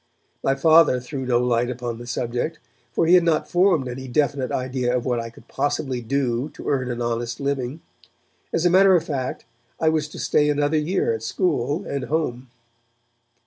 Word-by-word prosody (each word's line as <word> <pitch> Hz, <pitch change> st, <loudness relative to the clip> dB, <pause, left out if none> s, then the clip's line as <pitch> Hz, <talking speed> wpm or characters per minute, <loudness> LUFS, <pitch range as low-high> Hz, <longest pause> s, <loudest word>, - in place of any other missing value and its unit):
My 135 Hz, -, +2 dB
Father 155 Hz, -2 st, +5 dB
threw 130 Hz, +1 st, -6 dB
no 120 Hz, -1 st, +3 dB
light 120 Hz, 0 st, +1 dB
upon 120 Hz, -2 st, -4 dB
the 120 Hz, -, -9 dB
subject, 120 Hz, +6 st, -2 dB, 0.3 s
for 140 Hz, -, +1 dB
he 170 Hz, -, +4 dB
had 180 Hz, -1 st, +7 dB
not 165 Hz, -2 st, +1 dB
formed 175 Hz, -6 st, +3 dB
any 130 Hz, +2 st, -6 dB
definite 140 Hz, 0 st, 0 dB
idea 125 Hz, -1 st, -1 dB
of 120 Hz, -, -4 dB
what 125 Hz, -2 st, 0 dB
I 115 Hz, 0 st, -5 dB
could 115 Hz, 0 st, -18 dB
possibly 135 Hz, -2 st, -2 dB
do 125 Hz, +1 st, -1 dB
to -, -, -9 dB
earn 130 Hz, -3 st, 0 dB
an 120 Hz, 0 st, -3 dB
honest 120 Hz, 0 st, -2 dB
living. 140 Hz, +1 st, -2 dB, 0.7 s
As 165 Hz, -, 0 dB
a 175 Hz, -, +4 dB
matter 190 Hz, +1 st, +6 dB
of 170 Hz, -, +2 dB
fact 135 Hz, -5 st, -4 dB, 0.3 s
I 160 Hz, -, +3 dB
was 155 Hz, -1 st, 0 dB
to 150 Hz, -, -11 dB
stay 150 Hz, 0 st, +2 dB
another 145 Hz, +1 st, +1 dB
year 160 Hz, -4 st, 0 dB
at 110 Hz, -, -4 dB
school 150 Hz, -, -1 dB
and 140 Hz, -2 st, -3 dB
home. 130 Hz, -4 st, -2 dB
135 Hz, 185 wpm, -23 LUFS, 120-155 Hz, 0.7 s, had